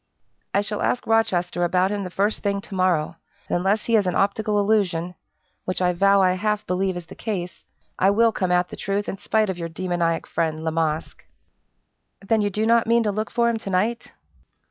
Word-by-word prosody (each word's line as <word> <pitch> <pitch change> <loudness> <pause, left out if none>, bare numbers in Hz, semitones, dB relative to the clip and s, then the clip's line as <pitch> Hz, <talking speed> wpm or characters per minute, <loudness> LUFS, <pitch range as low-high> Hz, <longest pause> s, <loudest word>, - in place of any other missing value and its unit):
"I 200 - +2
shall 210 0 -4
ask 250 - 0
Rochester 185 -6 +1
about 180 +2 +2
him 205 -1 -2
the 185 - -5
first 200 +4 0
thing 200 -1 0
to 200 - -11
morrow; 175 -4 +1 0.3
and - - -1
unless 195 +4 0
he 230 - +2
is 205 -4 +3
an 180 - 0
optical 205 +1 +1
illusion 185 -5 +1 0.5
which 185 -1 -2
I 180 -1 +2
vow 195 +2 +4
I 185 - +4
half 210 +3 -1
believe 185 0 -1
is 175 - -7
the - - -12
case 185 -5 -5 0.4
I 190 - +4
will 225 +3 +4
come 185 -4 -1
at 180 0 +2
the - - -7
truth 200 +1 -2
in 195 - -5
spite 215 -2 +1
of 180 - -7
your 165 0 -4
demoniac 170 -1 -1
friend, 160 -1 -2
La 160 - -1
Masque!" 160 -1 -2 1.0
"Then 215 +2 +1
you 205 - +1
do 210 +3 -1
not 230 0 +3
mean 235 0 +3
to 210 - 0
look 215 +2 -3
for 235 0 +1
him 235 -1 +1
to 200 - -7
night?" 215 +6 -1
195 Hz, 210 wpm, -23 LUFS, 180-215 Hz, 1.0 s, vow